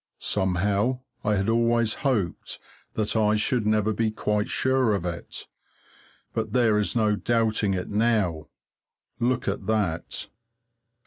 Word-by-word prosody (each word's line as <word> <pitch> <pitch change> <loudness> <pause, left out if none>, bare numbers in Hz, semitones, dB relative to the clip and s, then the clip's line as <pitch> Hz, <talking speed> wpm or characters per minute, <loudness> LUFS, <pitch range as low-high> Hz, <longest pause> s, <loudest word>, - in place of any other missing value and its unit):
Somehow, 100 +6 0 0.2
I 105 0 +2
had 95 0 0
always 115 0 +2
hoped 110 - -1 0.4
that 110 0 0
I 105 -1 +3
should 105 +1 +1
never 110 0 +2
be 115 +1 +1
quite 105 -1 -1
sure 130 -5 +2
of 90 - -3
it, 85 -1 -6 0.9
but 110 -2 -2
there 115 -4 +4
is 105 - -1
no 110 -2 +3
doubting 110 -3 +1
it 90 - -3
now. 105 -8 +1 0.7
Look 125 +2 0
at - - -2
that! 100 -7 -1
110 Hz, 130 wpm, -26 LUFS, 100-115 Hz, 0.9 s, there